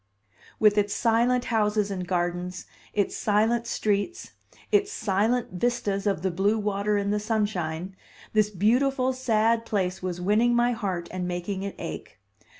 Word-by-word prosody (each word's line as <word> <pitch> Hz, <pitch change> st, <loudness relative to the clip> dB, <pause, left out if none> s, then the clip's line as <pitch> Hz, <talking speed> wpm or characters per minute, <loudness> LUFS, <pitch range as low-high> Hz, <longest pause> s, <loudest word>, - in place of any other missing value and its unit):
With 210 Hz, -1 st, +5 dB
its 205 Hz, 0 st, 0 dB
silent 240 Hz, +2 st, +2 dB
houses 210 Hz, -2 st, +1 dB
and 185 Hz, -2 st, -4 dB
gardens, 180 Hz, 0 st, -2 dB, 0.3 s
its 205 Hz, -2 st, 0 dB
silent 225 Hz, +3 st, +1 dB
streets, 215 Hz, -, -1 dB, 0.4 s
its 410 Hz, 0 st, +3 dB
silent 220 Hz, -, 0 dB
vistas 205 Hz, 0 st, -1 dB
of 195 Hz, -5 st, 0 dB
the 190 Hz, -, +1 dB
blue 200 Hz, +5 st, +1 dB
water 205 Hz, 0 st, 0 dB
in 200 Hz, 0 st, 0 dB
the 210 Hz, -, +1 dB
sunshine, 195 Hz, -5 st, -2 dB, 0.4 s
this 215 Hz, -1 st, +3 dB
beautiful, 255 Hz, +6 st, +2 dB
sad 230 Hz, -2 st, +2 dB
place 190 Hz, -5 st, -1 dB
was 180 Hz, -1 st, -3 dB
winning 215 Hz, +6 st, +3 dB
my 240 Hz, +1 st, +3 dB
heart 190 Hz, -7 st, -3 dB
and 180 Hz, -1 st, -3 dB
making 180 Hz, +2 st, -3 dB
it 200 Hz, 0 st, -5 dB
ache. 80 Hz, +1 st, -7 dB
210 Hz, 150 wpm, -26 LUFS, 190-230 Hz, 0.4 s, With